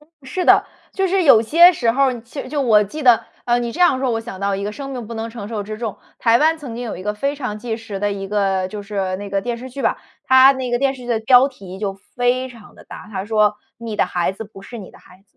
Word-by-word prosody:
嗯， 300 - -24
是 310 +8 -3
的， - - +6 0.3
就 385 -1 0
是 380 +1 +1
有 230 -7 +7
些 340 +10 +7
时 240 -8 +1
候 275 +3 +3
儿， 250 -3 -1
其 245 +5 -8
实 - - -10
就 290 +1 -2
我 215 -5 +5
记 300 +10 -7
得， 235 -3 +5 0.2
呃， 240 0 +2
你 240 -1 -3
这 360 - -7
样 350 -7 +4
说， 260 -1 0
我 225 -1 -1
想 225 -5 -9
到 200 0 0
一 195 +1 -3
个 210 - -3
“生 275 +4 -7
命 250 -4 -6
不 230 - -7
能 225 0 -4
承 225 -3 -8
受 215 -2 -3
之 215 +1 -7
重”。 220 -2 -5 0.2
台 230 0 +4
湾 315 +3 +3
曾 270 -7 -8
经 240 - -5
有 230 - -5
一 180 - -8
个 210 +2 -2
非 275 +7 -2
常 250 -7 -5
纪 225 0 -4
实 220 -3 -7
的 205 0 0
一 195 -1 -5
个 195 -2 0
就 205 +1 -7
是 195 -2 -3
那 200 +1 -7
个 195 0 0
电 240 +3 -3
视 255 +2 -8
剧 275 +2 -6
吧， - - +1 0.3
它 260 +1 +7
那 260 -2 -4
个 240 - +1
电 275 +1 +1
视 255 - -12
剧 - - -10
的 235 -2 +1
标 250 +3 +5
题 190 -8 -11
就 200 -1 -3 0.2
非 245 +1 +1
常 230 -4 -15
地 - - -16
大， - - -11
它 190 -1 -4
说 215 0 +3 0.4
《你 220 -2 -4
的 - - +2
孩 175 +1 -1
子 210 +3 -8
不 200 -2 -14
是 235 +4 -9
你 195 - -10
的 - - -18
孩 180 - -19
子》。 - - -29
230 Hz, 320 characters per minute, -20 LUFS, 205-260 Hz, 0.4 s, 有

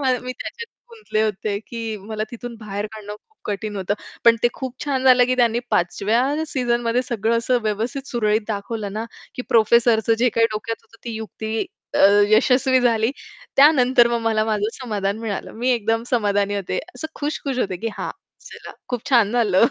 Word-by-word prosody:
मा 265 -2 +2
मी 255 0 -4
त्याच्यात 465 - -7 0.2
गुंतले 430 - -2
होते 210 -1 -1
की 225 -1 -4
मला 215 +2 -4
तिथून 240 0 -7
बाहेर 205 -1 -4
काढणं 210 -1 -8
खूप 440 - -35
कठीण 210 0 -4
होतं. 195 +1 -1 0.3
पण 230 -1 +7
ते 240 - +5
खूप 260 -2 -5
छान 270 -3 -1
झालं 250 -1 +7
की 255 - +1
त्यांनी 235 -2 +3
पाचव्या 235 - +1
सीझनमध्ये 240 -2 0
सगळं 230 -2 0
असं 245 +2 +1
व्यवस्थित 225 +6 -2
सुरळीत 215 -2 +1
दाखवलं 210 0 -4
ना, 215 +2 -3 0.3
की 250 - -4
प्रोफेसरचं 230 -1 +4
जे 250 +2 +4
काही 230 0 +3
डोक्यात 220 +2 -3
होतं, 225 - -21
ती 240 - -4
युक्ती 220 0 -4 0.3
अ, - - +1 0.3
यशस्वी 255 +4 +4
झाली. 230 -1 +2 0.5
त्यानंतर 260 -4 +6
मग 235 0 0
मला 220 -1 +1
माझं 215 -1 0
समाधान 205 -4 -2
मिळालं. 220 -4 -4
मी 250 +2 +1
एकदम 225 -1 +1
समाधानी 205 -4 +1
होते. 200 -3 -2 0.2
असं 315 - -5
खुश-खुश 285 -3 -3
होते 190 -6 -1
की 230 - +1
"हां, - - -3 0.4
चला - - -10 0.2
खूप 245 -3 -4
छान 235 -6 +5
झालं." 230 -3 +4
230 Hz, 175 wpm, -22 LUFS, 215-250 Hz, 0.5 s, पण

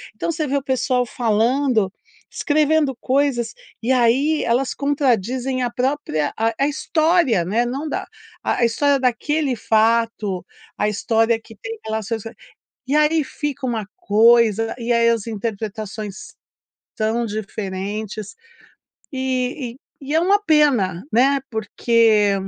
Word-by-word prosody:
então 280 - -2
você 320 -1 -2
vê 280 - -1
o 275 - -3
pessoal 255 -1 0
falando, 230 -1 +1 0.4
escrevendo 300 -2 +1
coisas 260 -3 0 0.3
e 240 +3 0
aí 260 +5 +3
elas 250 +3 +1
contradizem 260 -2 0
a 245 - -1
própria, 250 - -1
a 225 +1 +1
a 275 - +3
história, 310 - +2
né? 220 +7 +1
Não 270 +6 -3
da - - -3 0.4
a - - 0
a 240 - +3
história 280 +4 +2
daquele 265 +3 0
fato, 220 -3 +1 0.3
a - - +1
história 225 +2 +1
que 225 - -14
tem 450 - -7
relações 220 0 -3 0.7
e 280 - 0
aí 305 +1 +3
fica 285 -1 -4
uma 230 -4 -2
coisa 225 0 +4
e 240 0 -1
aí 235 0 +4
as 230 -2 -1
interpretações 215 -1 -5 0.6
são 225 +2 0
diferentes, 210 0 -5 0.8
e 255 -1 -2
e - - -17 0.2
e 285 +2 -4
é 320 - +4
uma 395 +4 +3
pena, 255 - +3
né? 275 +4 +4
Porque 220 -1 +2
235 Hz, 130 wpm, -21 LUFS, 220-275 Hz, 0.8 s, coisa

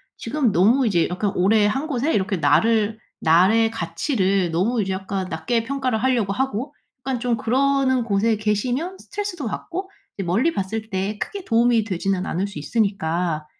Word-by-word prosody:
지금 250 -1 0
너무 230 +8 +4
이제 175 -5 +2
약간 195 +2 -1
오래 205 +3 +3
한 270 +9 0
곳에 285 +2 0
이렇게 195 -1 0
나를 220 +8 +2 0.2
나의 190 +8 +4
가치를 190 - 0
너무 215 +8 +1
이제 190 -1 -2
약간 190 0 -3
낮게 205 +7 -1
평가를 255 -4 -1
하려고 240 -6 +1
하고 265 +3 -2 0.3
약간 260 -1 -2
좀 240 -1 0
그러는 260 +2 +1
곳에 215 0 +1
계시면 245 - -1
스트레스도 400 -9 -5
받고 365 - -5 0.2
이제 195 - -4
멀리 225 - +1
봤을 220 +3 -3
때 195 +1 -2
크게 395 - -5
도움이 235 -3 +3
되지는 195 -1 -2
않을 190 +2 -2
수 200 -7 -8
있으니까 170 -3 -1
220 Hz, 350 characters per minute, -22 LUFS, 190-255 Hz, 0.3 s, 너무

